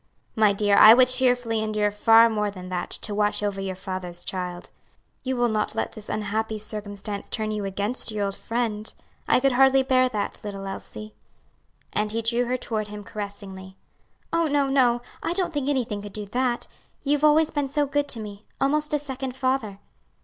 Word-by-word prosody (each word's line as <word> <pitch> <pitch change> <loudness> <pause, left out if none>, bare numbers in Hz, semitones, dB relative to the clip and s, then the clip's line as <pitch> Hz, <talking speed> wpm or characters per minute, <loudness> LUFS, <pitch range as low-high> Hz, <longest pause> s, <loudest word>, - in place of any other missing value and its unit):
"My 215 -2 +4
dear, 200 0 +2
I 220 +1 +10
would 255 0 +5
cheerfully 245 -3 +2
endure 215 -1 0
far 225 +2 +6
more 210 -2 -1
than 185 -2 -9
that, 180 -1 -3
to 210 - -5
watch 210 0 0
over 200 -1 -2
your 190 -1 -3
father's 185 -2 -6
child. 180 -1 -5 0.5
You 260 0 -2
will 240 -1 +2
not 215 -2 -1
let - - -2
this 215 -1 -10
unhappy 215 +1 -2
circumstance 205 -1 -6
turn 215 -2 -2
you 210 -1 -3
against 205 +6 -1
your 210 -2 -1
old 195 0 -2
friend? 225 -2 -3 0.4
I - - +4
could 275 +1 +3
hardly 265 +1 +5
bear 255 -1 +3
that, 210 -4 -3
little 195 -2 -6
Elsie." 215 +2 -8 0.8
And 210 0 0
he 225 +1 -2
drew 235 +2 +1
her 250 +1 -1
toward 215 -3 -3
him 210 0 -8
caressingly. 195 -2 -8 0.6
"Oh, 335 -1 +2
no, 285 -1 +2
no! 245 -3 +3 0.2
I 335 - -1
don't 360 -2 0
think 285 -2 -1
anything 240 -7 -1
could 205 -1 -9
do 210 -1 -4
that; 245 +3 -1 0.4
you've 290 +1 +1
always 305 +1 +5
been 290 -2 -1
so 290 +1 +1
good 290 +1 0
to 235 - 0
me 205 -1 -9
almost 300 +2 +1
a - - +3
second 265 -3 -4
father." 255 -7 -1
220 Hz, 190 wpm, -25 LUFS, 205-260 Hz, 0.8 s, I